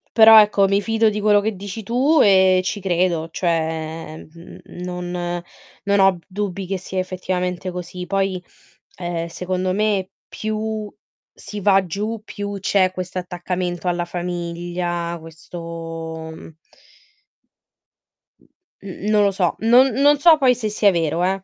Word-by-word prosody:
Però 220 -1 +9
ecco 205 -2 +4
mi 200 +1 +2
fido 225 +1 +2
di 210 0 -3
quello 205 -1 +4
che 215 -1 -2
dici 200 +3 -7
tu 260 +9 +2
e 190 -2 +5
ci 205 +2 -3
credo, 175 -3 0
cioè 160 -2 -2 0.2
n 170 +1 -13
non 180 0 -6 0.7
non 200 0 +2
ho 190 -2 +4
dubbi 195 -1 -4
che 195 +1 -2
sia 185 +1 -5
effettivamente 185 0 -3
così. 180 0 -6
Poi, 195 0 -1 0.6
ehm, 175 -2 -3
secondo 185 +2 -2
me 205 -2 0 0.2
più 215 0 -4 0.5
si 205 0 -8
va 195 -1 +4
giù, 210 +5 -3
più 205 -2 -6
c'è 190 -1 +2
questo 185 0 -6
attaccamento 180 -1 -4
alla 175 0 0
famiglia, 175 0 -4
questo, 165 0 -8
mhmm 160 0 -12 1.9
mhmm, - - -28 0.3
n 195 +1 -6
non 210 -1 +4
lo 200 - +3
so. 185 -3 0 0.2
Non 250 +2 +8 0.2
non 290 0 +6
so 320 +1 +7
poi 260 -4 +4
se 225 -3 -3
sia 210 -1 +3
vero, 165 -1 0
eh, 190 +1 0
185 Hz, 145 wpm, -21 LUFS, 175-205 Hz, 1.9 s, Però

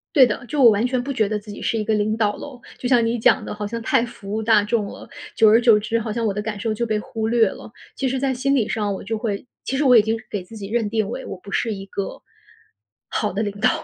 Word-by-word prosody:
对 265 -4 +8
的， 235 +1 -3
就 280 +4 0
我 235 - +9
完 215 +3 +2
全 250 -1 -1
不 275 +3 -3
觉 220 -5 +1
得 215 0 -1
自 210 0 -12
己 205 - -8
是 225 - 0
一 215 - -1
个 220 - +1
领 215 +1 0
导 210 -2 +1
咯。 265 -4 -9 0.2
就 250 - -3
像 245 -3 +4
你 230 +1 0
讲 220 - +3
的 - - -5
好 210 0 -4
像 230 +3 -4
太 230 - +2
服 200 -4 -10
务 220 +1 -1
大 220 -1 +4
众 210 0 0
了， - - -10 0.3
久 220 -1 +5
而 220 +2 +6
久 230 -3 +6
之 220 +2 -1
好 220 -1 -3
像 230 +1 -2
我 200 - 0
的 210 - -2
感 210 -1 -5
受 225 +1 -1
就 235 - -1
被 215 -1 0
忽 220 0 -3
略 230 -2 +4
了。 210 - -10 0.2
其 270 - 0
实 260 +1 -2
在 270 -1 +1
心 275 +3 +1
理 235 -6 +1
上 210 -3 -1
我 - - -7
就 225 +3 -3
会 215 0 -3 0.2
其 265 - -2
实 290 - +1
我 250 -3 +7
已 220 - +7
经 220 +2 0
给 205 - -3
自 200 +5 -13
己 200 -2 -6
认 225 0 0
定 220 -2 0
为 255 +4 -5
我 - - -6
不 195 - -12
是 225 +3 0
一 195 0 -8
个， 200 0 -5 0.9
好 - - -1
的 200 +4 -1
领 205 -2 -2
导。 215 - +3
220 Hz, 320 characters per minute, -22 LUFS, 210-240 Hz, 0.9 s, 我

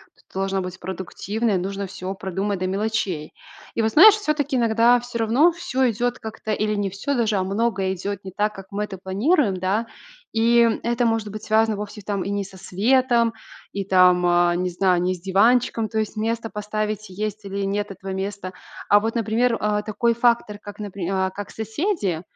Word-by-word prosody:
то - - -25
ты 190 - -5
должна 195 0 0
быть 185 0 -7
продуктивная. 190 +4 -2
Нужно 195 +2 -3
всё 185 +1 -5
продумать 195 0 -3
до 185 - -1
мелочей. 195 -5 -2 0.4
И - - 0
вот 220 0 +1
знаешь, 400 - +9
всё-таки 305 -9 -1
иногда 235 +1 +4
всё 240 0 -6
равно 245 +10 +4
всё 300 -7 0
идет 245 +2 -1
как-то 220 0 -6
или 215 0 0
не 200 -2 -1
всё 200 +9 -2
даже, 220 -4 +1
а 185 - +1
много 195 -1 0
идет 195 +1 -4
не 190 - -7
так, 210 +3 0
как 195 -2 -10
мы 205 +1 -2
это 195 -3 -7
планируем, 205 - +1
да. 195 +5 -1 0.5
И 230 +1 +4 0.2
это 240 +1 +1
может 225 -2 0
быть 215 +1 -8
связано 220 0 +2
вовсе 210 +1 -7
там 200 -1 -2
и - - -4
не 200 0 -2
со 190 0 -13
светом, 235 +5 +2 0.4
и 200 - -2
там, 180 -2 +4
а, 175 0 +3
не 180 +1 -1
знаю, 180 0 +2
не 180 +1 +1
с 180 - -8
диванчиком. 220 +4 +2
То 220 - -1
есть 215 0 -3
место 225 +1 -2
поставить 210 0 -3
есть, 210 +2 -4
или 200 0 -4
нет 205 +1 -2
этого 190 0 -7
места. 190 -1 -4 0.3
А 205 - +6
вот, 225 +2 -2
например, 230 +1 +1
а, 210 0 0
такой 225 +3 0
фактор 235 -3 +1
как, 205 0 -11
напри 200 -4 -5
а, 190 -1 0
как 205 +1 -7
соседи, 220 - -2
210 Hz, 195 wpm, -23 LUFS, 190-230 Hz, 0.5 s, знаешь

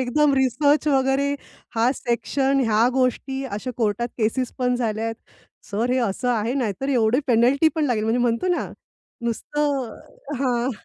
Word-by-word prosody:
एकदम 280 +4 +2
रिसर्च 270 +3 +2
वगैरे 270 0 +2 0.4
हा 230 +2 +3
सेक्शन 270 +3 0
ह्या 225 +2 +3
गोष्टी, 265 +1 0
अशा 250 0 -4
कोर्टात 230 0 0
केसेस 235 +3 0
पण 250 -1 +1
झाल्या 225 -2 -1
आहेत. 225 0 -2 0.6
"सर 225 +4 0
हे 255 - +2
असं 240 +1 -1
आहे 230 0 0
नाहीतर 255 -1 -2
एवढी 245 -1 +2
पेनल्टी 255 +5 +4
पण 315 - +1
लागेल," 235 -6 0
म्हणजे 225 +2 +1
म्हणतो 240 +8 +1
ना, 355 - -1 0.5
नुसतं 270 +2 -2 0.4
हां, 250 -1 0
250 Hz, 150 wpm, -23 LUFS, 230-270 Hz, 0.6 s, पेनल्टी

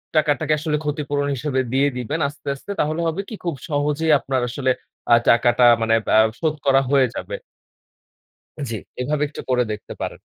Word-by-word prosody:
টাকাটাকে 155 0 +2
আসলে 150 0 -1
ক্ষতিপূরণ 145 -1 -1
হিসেবে 130 0 -1
দিয়ে 140 +2 +3
দিবেন 125 +6 -3
আস্তে, 145 +1 -12
আস্তে 140 - -9
তাহলে 155 +3 0
হবে 165 +4 -1
কি, 220 - -6
খুব 170 -4 -2
সহজেই 150 +2 +1
আপনার 135 -2 -1
আসলে 130 +1 0 0.4
আ - - +10
টাকাটা 120 +1 +4 0.2
মানে 115 0 +2 0.2
আ - - +8 0.2
শোধ 155 -2 0
করা 135 -1 +5
হয়ে 135 -2 +4
যাবে। - - -5 1.4
জি, - - -3 0.3
এভাবে 150 +3 -1
একটু 145 - -8
করে 125 -1 +3
দেখতে 105 - -7
পারেন। - - -4
145 Hz, 170 wpm, -21 LUFS, 130-155 Hz, 1.4 s, আ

